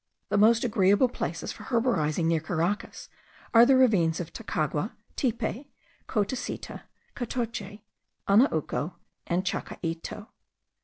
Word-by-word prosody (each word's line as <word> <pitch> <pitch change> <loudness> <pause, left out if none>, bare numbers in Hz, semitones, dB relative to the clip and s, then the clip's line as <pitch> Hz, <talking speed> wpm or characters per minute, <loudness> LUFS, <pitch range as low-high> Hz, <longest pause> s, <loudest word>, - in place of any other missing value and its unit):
The - - +1
most 225 +2 +5
agreeable 205 +1 +3
places - - -4
for - - -10
herborizing 200 - +1
near 165 0 +2
Caracas 170 +5 -2 0.5
are 235 +1 +8
the 270 - +6
ravines 190 -11 +3
of 175 - -6
Tacagua, - - -2 0.2
Tipe, 255 +1 -2 0.4
Cotecita, 215 +3 -3 0.3
Catoche, 230 -4 -4 0.5
Anauco, 180 - +2 0.3
and 180 +2 0
Chacaito.) 170 +3 -4
205 Hz, 105 wpm, -27 LUFS, 170-240 Hz, 0.5 s, are